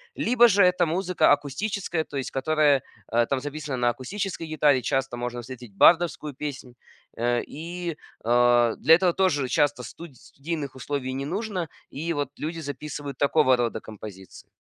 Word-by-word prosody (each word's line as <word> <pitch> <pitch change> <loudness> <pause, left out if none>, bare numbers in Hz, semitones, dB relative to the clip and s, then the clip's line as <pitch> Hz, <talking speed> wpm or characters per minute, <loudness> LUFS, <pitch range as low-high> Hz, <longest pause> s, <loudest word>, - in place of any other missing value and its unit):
Либо 240 0 +4
же 200 -1 +5
это 180 -1 +3
музыка 180 +2 +2
акустическая, 160 +4 -1
то 145 - -7
есть 135 - -3
которая, 145 -1 +2 0.2
а, 120 +1 +2
там 135 +2 -1
записана 145 -1 -5
на 120 0 +1
акустической 170 - -4
гитаре. 150 -4 +3
Часто 135 +1 -1
можно 120 0 -4
встретить 120 -3 -10
бардовскую 165 - +4
песнь. 130 -3 -6 0.4
Э, 120 +1 +1
и, 170 +2 -6 0.3
а, 120 0 +4
для 160 +5 +6
этого 175 -1 +2
тоже 165 -8 +1
часто 145 -1 +1
студ 165 +5 -10
студийных 145 -2 -6
условий 130 0 -3
не 135 +1 -3
нужно. 185 0 -3 0.2
И 165 +4 -4
вот 145 -3 -2
люди 165 +2 -4
записывают 145 -2 -6
такого 145 -2 +4
рода 120 -2 -1
композиции. 100 -4 -11
145 Hz, 155 wpm, -25 LUFS, 125-165 Hz, 0.4 s, для